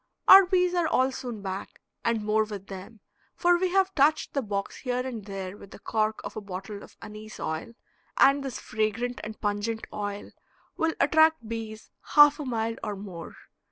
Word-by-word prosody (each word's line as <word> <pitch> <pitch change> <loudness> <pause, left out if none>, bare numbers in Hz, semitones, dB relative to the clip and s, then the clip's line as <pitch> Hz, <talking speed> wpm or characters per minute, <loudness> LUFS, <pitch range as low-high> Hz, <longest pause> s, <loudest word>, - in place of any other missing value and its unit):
Our 385 -1 +10
bees 360 -1 +2
are 350 -2 +2
all 260 -3 +2
soon 240 -5 -6
back, 190 0 -6 0.2
and 230 -2 0
more 215 +1 +2
with 205 -3 -7
them, 195 +2 -10 0.3
for 350 0 +3
we 370 0 +1
have 385 +1 +2
touched 295 +1 +2
the 275 - 0
box 200 -4 -4
here 250 -1 -2
and 235 -5 -5
there 195 -1 -6
with 200 - -13
the - - -11
cork 215 0 -1
of - - -7
a 215 - -4
bottle 200 +1 -7
of - - -15
anise 215 0 -10
oil, 160 +8 -4 0.4
and 275 +1 +5
this 270 -3 -5
fragrant 220 +3 -2
and 215 0 -7
pungent 210 +2 -2
oil 205 -1 -5 0.4
will 325 0 0
attract 315 -6 +4
bees 220 -1 -6 0.2
half 295 0 +8
a 295 - -4
mile 230 -2 -2
or 210 -2 -3
more. 190 -4 -9
220 Hz, 185 wpm, -27 LUFS, 205-275 Hz, 0.4 s, Our